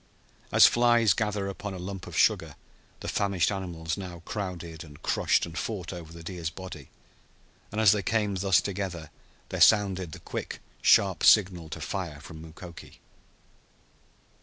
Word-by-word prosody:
As -, -, +8 dB
flies 120 Hz, -4 st, +4 dB
gather 105 Hz, 0 st, -1 dB
upon 100 Hz, 0 st, -5 dB
a -, -, -6 dB
lump 95 Hz, +1 st, -7 dB
of -, -, -6 dB
sugar -, -, +2 dB, 0.5 s
the -, -, -6 dB
famished 100 Hz, -2 st, +1 dB
animals 85 Hz, -4 st, -4 dB
now 90 Hz, -4 st, -8 dB
crowded 85 Hz, -5 st, -5 dB
and 75 Hz, -3 st, -14 dB
crushed -, -, +2 dB
and 85 Hz, -1 st, -10 dB
fought 95 Hz, -2 st, -4 dB
over 85 Hz, -3 st, -9 dB
the 85 Hz, 0 st, -11 dB
deer's 85 Hz, -2 st, -4 dB
body, 90 Hz, -6 st, -10 dB, 0.8 s
and 105 Hz, -, -3 dB
as 110 Hz, -3 st, +7 dB
they 105 Hz, -1 st, +1 dB
came 105 Hz, +1 st, 0 dB
thus 95 Hz, -3 st, +3 dB
together 90 Hz, -5 st, -5 dB, 0.4 s
there -, -, -4 dB
sounded 95 Hz, -5 st, +4 dB
the -, -, -8 dB
quick -, -, -6 dB, 0.2 s
sharp 95 Hz, -2 st, +4 dB
signal 90 Hz, -6 st, +4 dB
to 70 Hz, -, -6 dB
fire 85 Hz, -7 st, -4 dB
from 80 Hz, +1 st, -11 dB
Mukoki. 85 Hz, +2 st, -12 dB
95 Hz, 155 wpm, -28 LUFS, 85-100 Hz, 0.8 s, As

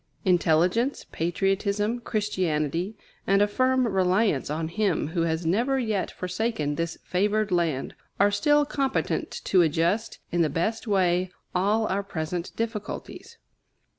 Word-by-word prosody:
Intelligence, 180 Hz, -, +2 dB
patriotism, 200 Hz, +6 st, 0 dB
Christianity, 185 Hz, -, -1 dB, 0.3 s
and 195 Hz, +1 st, +4 dB
a 205 Hz, -, +4 dB
firm 255 Hz, +3 st, +2 dB
reliance 190 Hz, -, +1 dB
on 160 Hz, +2 st, -2 dB
Him 185 Hz, -5 st, 0 dB
who 165 Hz, +1 st, -1 dB
has 165 Hz, 0 st, -1 dB
never 235 Hz, +11 st, +2 dB
yet 220 Hz, -6 st, -1 dB
forsaken 180 Hz, -5 st, -2 dB
this 165 Hz, +1 st, -3 dB
favored 210 Hz, +3 st, 0 dB
land, 165 Hz, -6 st, 0 dB, 0.3 s
are 200 Hz, +1 st, +5 dB
still 295 Hz, +8 st, +3 dB
competent 275 Hz, -2 st, -1 dB
to 185 Hz, -, +4 dB
adjust, 170 Hz, +7 st, +1 dB
in 175 Hz, -, +1 dB
the 160 Hz, -, +3 dB
best 220 Hz, +10 st, -2 dB
way, 185 Hz, -2 st, +2 dB, 0.2 s
all 205 Hz, +5 st, +2 dB
our 200 Hz, -1 st, 0 dB
present 170 Hz, -2 st, -4 dB
difficulties. 225 Hz, -2 st, -5 dB
190 Hz, 130 wpm, -26 LUFS, 170-215 Hz, 0.3 s, are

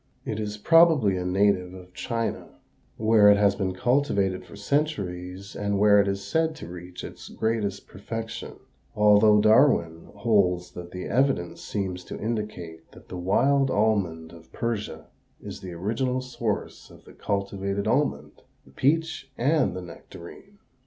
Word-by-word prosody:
It 110 Hz, -, -3 dB
is 105 Hz, -1 st, -4 dB
probably 155 Hz, -, +5 dB
a 90 Hz, -, -2 dB
native 95 Hz, -1 st, +1 dB
of 90 Hz, -1 st, -13 dB
China, 115 Hz, +6 st, -4 dB, 0.4 s
where 110 Hz, -1 st, +5 dB
it 100 Hz, -, +6 dB
has 100 Hz, -1 st, +4 dB
been 95 Hz, -2 st, -3 dB
cultivated 100 Hz, -6 st, +1 dB
for 90 Hz, -, -14 dB
centuries 100 Hz, -, -3 dB
and 100 Hz, 0 st, -1 dB
where 105 Hz, 0 st, +5 dB
it 100 Hz, -, -1 dB
is 100 Hz, 0 st, -3 dB
said 160 Hz, +8 st, 0 dB
to 85 Hz, -, -9 dB
reach 90 Hz, +1 st, -9 dB
its -, -, -9 dB
greatest 110 Hz, -3 st, -2 dB
perfection, 115 Hz, +3 st, -6 dB, 0.4 s
although 105 Hz, 0 st, +5 dB
Darwin 105 Hz, -, +3 dB
holds 100 Hz, -5 st, +1 dB
that 85 Hz, -1 st, -9 dB
the 90 Hz, 0 st, -7 dB
evidence 130 Hz, -10 st, 0 dB
seems 95 Hz, -3 st, -4 dB
to -, -, -7 dB
indicate 105 Hz, -8 st, -5 dB
that -, -, -17 dB
the -, -, -7 dB
wild 135 Hz, +10 st, +2 dB
almond 100 Hz, -8 st, 0 dB
of 85 Hz, -1 st, -16 dB
Persia 115 Hz, -3 st, -4 dB, 0.3 s
is -, -, -9 dB
the 90 Hz, -2 st, -7 dB
original 115 Hz, +9 st, -1 dB
source 130 Hz, -1 st, -4 dB
of -, -, -17 dB
the -, -, -15 dB
cultivated 100 Hz, 0 st, -3 dB
almond, 145 Hz, +7 st, -1 dB, 0.2 s
the 65 Hz, -, -19 dB
peach, 150 Hz, -, 0 dB
and 140 Hz, -, +1 dB
the 90 Hz, -, -6 dB
nectarine. 90 Hz, -, -12 dB
100 Hz, 150 wpm, -25 LUFS, 90-115 Hz, 0.4 s, it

